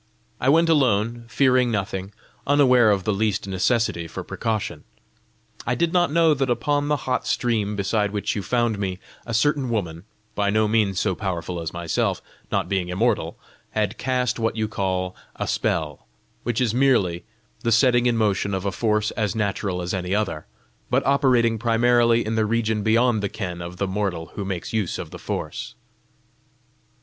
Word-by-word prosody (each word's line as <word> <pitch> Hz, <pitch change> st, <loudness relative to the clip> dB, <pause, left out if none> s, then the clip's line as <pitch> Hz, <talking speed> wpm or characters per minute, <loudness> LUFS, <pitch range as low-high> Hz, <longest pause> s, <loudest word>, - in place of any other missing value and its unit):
I 130 Hz, -, +2 dB
went 165 Hz, +3 st, +5 dB
alone, 120 Hz, -6 st, +2 dB
fearing 125 Hz, 0 st, +3 dB
nothing, 95 Hz, -3 st, -3 dB, 0.4 s
unaware 130 Hz, -5 st, +5 dB
of 100 Hz, -2 st, +2 dB
the 105 Hz, -, 0 dB
least 100 Hz, -1 st, 0 dB
necessity 95 Hz, -2 st, 0 dB
for -, -, -6 dB
precaution. 105 Hz, -8 st, -3 dB, 0.8 s
I 120 Hz, -, +1 dB
did 170 Hz, +6 st, 0 dB
not 175 Hz, -4 st, +3 dB
know 165 Hz, 0 st, +4 dB
that 135 Hz, -2 st, -1 dB
upon 145 Hz, +5 st, 0 dB
the 150 Hz, -, +2 dB
hot 130 Hz, -1 st, -1 dB
stream 110 Hz, -4 st, 0 dB
beside 105 Hz, +1 st, 0 dB
which 105 Hz, 0 st, -2 dB
you 105 Hz, -, -2 dB
found 120 Hz, -1 st, 0 dB
me, 95 Hz, -2 st, -2 dB, 0.3 s
a 115 Hz, -, -4 dB
certain 140 Hz, +2 st, +2 dB
woman, 90 Hz, -6 st, -3 dB, 0.3 s
by 100 Hz, -1 st, 0 dB
no 110 Hz, +1 st, +2 dB
means 105 Hz, -4 st, +1 dB
so 95 Hz, -, +1 dB
powerful 90 Hz, -3 st, -3 dB
as 80 Hz, -, -4 dB
myself, 85 Hz, -2 st, -1 dB, 0.3 s
not -, -, 0 dB
being 95 Hz, -3 st, -1 dB
immortal, 95 Hz, -3 st, 0 dB, 0.4 s
had 105 Hz, 0 st, -1 dB
cast 125 Hz, -1 st, 0 dB
what 115 Hz, 0 st, 0 dB
you 110 Hz, -1 st, -1 dB
call 95 Hz, -3 st, -2 dB, 0.2 s
a -, -, -3 dB
spell 75 Hz, -3 st, -2 dB, 0.3 s
which 120 Hz, -1 st, -1 dB
is 120 Hz, -4 st, +1 dB
merely 115 Hz, -10 st, +2 dB, 0.4 s
the 115 Hz, -, -1 dB
setting 120 Hz, +1 st, +4 dB
in 120 Hz, -1 st, +2 dB
motion 100 Hz, -2 st, +1 dB
of 95 Hz, +1 st, -4 dB
a 100 Hz, -, 0 dB
force 105 Hz, +1 st, 0 dB
as 105 Hz, -1 st, -2 dB
natural 100 Hz, -4 st, -1 dB
as 85 Hz, -, -3 dB
any 95 Hz, 0 st, -1 dB
other, 95 Hz, -8 st, -2 dB, 0.4 s
but -, -, +1 dB
operating 125 Hz, -5 st, +3 dB
primarily 120 Hz, 0 st, +3 dB
in 110 Hz, +1 st, -1 dB
a -, -, +3 dB
region 110 Hz, 0 st, 0 dB
beyond 110 Hz, +1 st, +3 dB
the 100 Hz, -, -1 dB
ken 90 Hz, -5 st, -5 dB
of 85 Hz, +1 st, -7 dB
the 100 Hz, -, 0 dB
mortal 95 Hz, -4 st, -3 dB
who 100 Hz, -, -4 dB
makes 95 Hz, 0 st, -4 dB
use 105 Hz, -6 st, -1 dB
of -, -, -7 dB
the -, -, -9 dB
force. -, -, -5 dB
110 Hz, 175 wpm, -23 LUFS, 95-120 Hz, 0.8 s, went